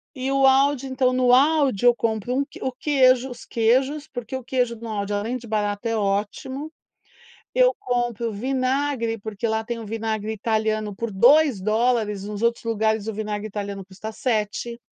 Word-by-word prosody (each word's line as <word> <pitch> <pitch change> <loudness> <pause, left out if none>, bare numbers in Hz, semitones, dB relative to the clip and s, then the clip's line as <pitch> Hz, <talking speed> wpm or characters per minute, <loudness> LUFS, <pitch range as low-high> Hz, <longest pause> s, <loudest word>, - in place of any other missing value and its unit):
e 265 +1 -2
o 270 0 +4
Aldi, 270 0 +3
então, 260 -1 +1
no 250 -1 +3
Aldi, 275 -5 +3
eu 240 - +7
compro 225 +1 -1
um 280 - +2
q - - -14
o 260 - -1
queijo, 260 -1 +3
os 240 -1 -10
queijos, 265 +6 +1
porque 245 -3 -6
o 260 - -5
queijo 245 -1 0
no 230 +1 -8
Aldi, 205 -1 -3
além 225 +5 -2
de 235 - -12
barato, 210 +1 -1
é 225 - 0
ótimo. 215 +9 -2 0.8
Eu - - +4
compro 240 - -1
vinagre, 255 0 -1
porque 215 +2 -4
lá 220 0 -1
tem 235 0 -4
um - - -7
vinagre 220 0 -3
italiano 215 -1 -1
por 230 +2 -4
2 255 +2 +5
dólares, 215 -1 +1
nos 210 +1 -5
outros 235 0 +1
lugares 220 -1 0
o - - -1
vinagre 210 0 -4
italiano 200 -1 -5
custa 200 +3 -8
7 235 -1 -2
230 Hz, 175 wpm, -23 LUFS, 215-260 Hz, 0.8 s, eu